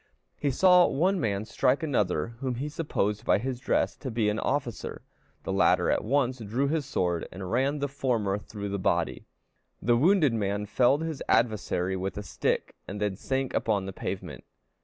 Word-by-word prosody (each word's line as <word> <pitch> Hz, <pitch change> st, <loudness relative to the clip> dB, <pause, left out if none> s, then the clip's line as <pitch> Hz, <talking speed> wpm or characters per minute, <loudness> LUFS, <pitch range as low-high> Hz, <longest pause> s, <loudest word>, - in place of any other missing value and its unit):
He 145 Hz, -, -1 dB
saw 180 Hz, +6 st, +6 dB
one 180 Hz, +7 st, +1 dB
man 100 Hz, -4 st, -1 dB
strike 130 Hz, +5 st, +1 dB
another 105 Hz, -, 0 dB
whom 130 Hz, -2 st, -2 dB
he 140 Hz, +5 st, -3 dB
supposed 105 Hz, -9 st, -1 dB
by -, -, +3 dB
his 125 Hz, +3 st, -3 dB
dress 130 Hz, -, 0 dB
to 135 Hz, -, -5 dB
be 110 Hz, -3 st, +1 dB
an 105 Hz, +1 st, -1 dB
officer; 130 Hz, -5 st, -3 dB, 0.4 s
the 95 Hz, -, -3 dB
latter 95 Hz, -, +3 dB
at -, -, +1 dB
once 130 Hz, +1 st, +1 dB
drew 115 Hz, +6 st, -1 dB
his 150 Hz, -2 st, -1 dB
sword, 90 Hz, -10 st, -1 dB
and 95 Hz, 0 st, -6 dB
ran 135 Hz, +5 st, +1 dB
the 140 Hz, 0 st, -1 dB
former 120 Hz, -8 st, -1 dB
through 100 Hz, -1 st, -6 dB
the 100 Hz, 0 st, -2 dB
body. -, -, 0 dB, 0.5 s
The 120 Hz, +2 st, +2 dB
wounded 155 Hz, -, +4 dB
man 105 Hz, -1 st, -1 dB
felled 130 Hz, +8 st, +3 dB
his 160 Hz, -4 st, -4 dB
adversary 95 Hz, -5 st, +1 dB
with 95 Hz, 0 st, -3 dB
a 105 Hz, -, -4 dB
stick, 95 Hz, -, -1 dB
and 100 Hz, +2 st, -5 dB
then 105 Hz, -2 st, -1 dB
sank 130 Hz, +5 st, -2 dB
upon 105 Hz, -4 st, 0 dB
the 95 Hz, -, -6 dB
pavement. -, -, -5 dB
120 Hz, 180 wpm, -28 LUFS, 100-140 Hz, 0.5 s, saw